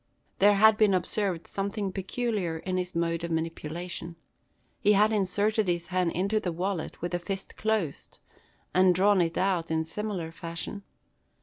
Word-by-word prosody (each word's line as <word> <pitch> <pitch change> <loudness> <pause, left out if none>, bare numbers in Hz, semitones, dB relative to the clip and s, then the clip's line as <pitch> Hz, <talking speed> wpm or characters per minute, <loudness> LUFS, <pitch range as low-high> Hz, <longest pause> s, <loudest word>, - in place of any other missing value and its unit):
There 205 +1 +6
had 215 +1 +6
been 210 -3 +4
observed 185 -1 -1
something 200 0 -3
peculiar 195 -3 -2
in 185 +3 -3
his 180 -1 -3
mode 170 0 0
of 170 - -3
manipulation. 165 +1 -4 0.6
He 210 - +4
had 210 +2 +4
inserted 210 +1 +1
his 175 -1 0
hand 180 -2 +1
into 200 +5 +1
the 180 - -2
wallet 175 -1 -3
with 175 - -2
the 175 - -1
fist 195 +2 -6
closed; 215 -9 -2 0.6
and 185 +1 +5
had 180 - +5
drawn 195 +1 +4
it 165 -1 0
out 185 -3 +1
in 160 0 +1
similar 180 -1 -4
fashion. 170 +4 -5
185 Hz, 165 wpm, -28 LUFS, 170-205 Hz, 0.6 s, There